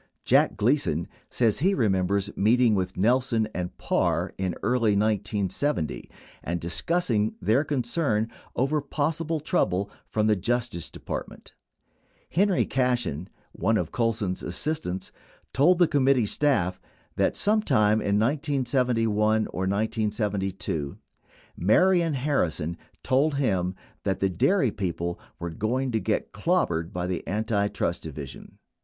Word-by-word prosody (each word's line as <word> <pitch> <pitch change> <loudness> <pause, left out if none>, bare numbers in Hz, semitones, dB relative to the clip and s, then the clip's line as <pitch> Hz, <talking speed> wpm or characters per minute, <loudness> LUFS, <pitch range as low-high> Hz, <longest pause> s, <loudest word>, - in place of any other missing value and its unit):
Jack - - +3
Gleason 105 - +1 0.2
says 115 -4 +2
he 190 +6 +2
remembers 100 -2 0
meeting 115 +2 +4
with 95 -2 -1
Nelson 115 +2 +2
and 90 -1 -4
Parr, 85 +1 0
in 95 -2 -1
early 115 -1 +2
1970, 105 - -1 0.3
and 85 +1 -2
discussing 110 - 0
their 110 +9 +2
concern 125 -5 0 0.3
over 140 +4 +1
possible 155 +3 -1
trouble 100 - 0 0.2
from 105 -1 0
the 110 -1 +4
Justice 115 -2 -2
Department, - - -7 0.8
Henry 195 +2 +2
Cashen, 120 - -1 0.2
one 110 +5 +1
of 85 -5 -2
Colson's 110 -5 -1
assistants, 150 - -3 0.4
told 170 +7 +4
the 175 -1 +5
committee 135 -5 +3
staff 100 -8 +1 0.3
that - - +1
sometime 110 - +3
in 100 0 +1
1971 120 -5 +1
or 95 +1 -2
1972, 100 -7 -1 0.6
Marion 170 - +3
Harri 135 - +1
son 85 +1 -4 0.3
told 140 +3 +2
him 95 -9 0 0.3
that 95 -2 -1
the 95 - +2
dairy 130 - +2
people 85 -3 -3 0.2
were 85 0 -5
going 125 +9 -1
to 110 - +1
get 110 0 -1
clobbered 100 - 0
by 90 0 -3
the 90 -1 -2
Antitrust 105 0 -1
Division. 75 -4 -9
110 Hz, 120 wpm, -26 LUFS, 95-135 Hz, 0.8 s, the